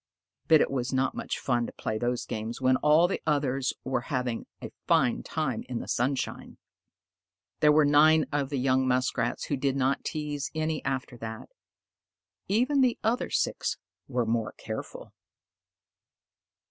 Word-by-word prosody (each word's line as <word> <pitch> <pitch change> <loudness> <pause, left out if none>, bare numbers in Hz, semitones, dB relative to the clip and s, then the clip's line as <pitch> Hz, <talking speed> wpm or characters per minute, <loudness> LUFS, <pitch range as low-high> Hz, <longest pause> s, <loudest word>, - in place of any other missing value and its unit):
But 160 -2 +6
it - - +1
was 125 -2 -2
not 130 0 +1
much - - -4
fun 120 -2 0
to - - -7
play 110 0 -3
those 120 +1 -1
games 110 +2 -5
when 130 0 +3
all 155 +5 +5
the 195 - -3
others 135 -3 +1
were 130 - -1
having 125 -5 -2
a - - -8 0.2
fine 120 - +3
time 150 -8 -2
in 125 - -3
the - - -5
sunshine. 130 +2 -2 1.0
There 150 - +6
were 150 0 +5
nine 155 +1 +5
of 145 -2 -1
the 145 - -2
young 130 0 +2
Muskrats 130 0 0
who 145 - -2
did 135 0 0
not 135 0 +1
tease 150 -2 -3
any 155 -1 -1
after 130 -2 -3
that. 110 -1 -7 1.0
Even 250 +8 +2
the 250 -2 +3
other 230 +3 0
six - - -1 0.3
were 125 -3 0
more 110 -1 -1
careful. - - -7
135 Hz, 155 wpm, -28 LUFS, 125-150 Hz, 1.0 s, But